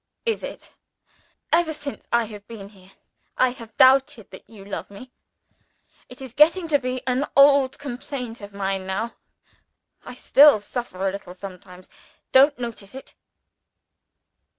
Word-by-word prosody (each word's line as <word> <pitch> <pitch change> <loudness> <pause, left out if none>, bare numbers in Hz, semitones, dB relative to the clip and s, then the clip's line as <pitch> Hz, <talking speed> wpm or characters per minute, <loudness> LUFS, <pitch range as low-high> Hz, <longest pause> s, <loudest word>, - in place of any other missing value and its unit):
"Is 455 -1 -1
it? - - -9 0.8
Ever 330 -1 +2
since 290 -2 -8
I 235 0 +3
have 210 -2 -11
been 205 -4 -10
here, 190 -2 -19 0.5
I 255 - +3
have 230 -3 -12
doubted 260 -5 +4
that 190 - -14
you 205 -3 -14
love 200 - -6
me. 225 +6 -13 1.0
It 250 +1 -11
is 255 -3 -10
getting 330 +5 +4
to 290 -2 +3
be 255 -1 -4
an 260 +3 -1
old 275 -1 +5
complaint 250 -3 -7
of 205 0 -10
mine 195 -1 -3
now. 220 +5 -3 0.9
I 250 - -10
still 285 -1 +6
suffer 205 -3 -5
a - - 0
little 190 -2 -9
sometimes. 185 -1 -11 0.4
Don't 280 +2 +5
notice 235 -3 -8
it!" 265 - -11
240 Hz, 145 wpm, -23 LUFS, 200-270 Hz, 1.0 s, still